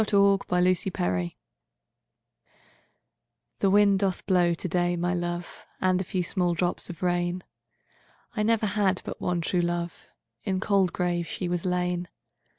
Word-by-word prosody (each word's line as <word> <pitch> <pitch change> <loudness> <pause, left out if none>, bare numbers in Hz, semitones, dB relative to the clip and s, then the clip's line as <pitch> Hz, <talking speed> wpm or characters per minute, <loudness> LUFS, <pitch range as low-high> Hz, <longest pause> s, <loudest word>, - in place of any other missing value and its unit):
The 205 -1 +2
Unquiet 185 -1 +3
Grave 90 -1 -1 2.3
I'THE 195 - +4
WIND 200 0 +5
doth 190 -2 -1
blow 175 -3 +3
today, 175 0 0
my 175 +1 0
love, 175 0 -4 0.2
And 185 0 +2
a - - -1
few 185 0 -2
small 175 -1 +1
drops 175 +1 -1
of 175 0 -7
rain;I 175 +4 -5
never 225 0 +2
had 200 -2 +1
but - - -6
one 175 -1 0
true 175 +2 +1
love; 175 0 -3 0.4
In 190 -1 -1
cold 195 -2 +2
grave 175 -2 -1
she 180 - -3
was 175 0 -2
lain. 180 -1 0
180 Hz, 140 wpm, -27 LUFS, 175-190 Hz, 2.3 s, WIND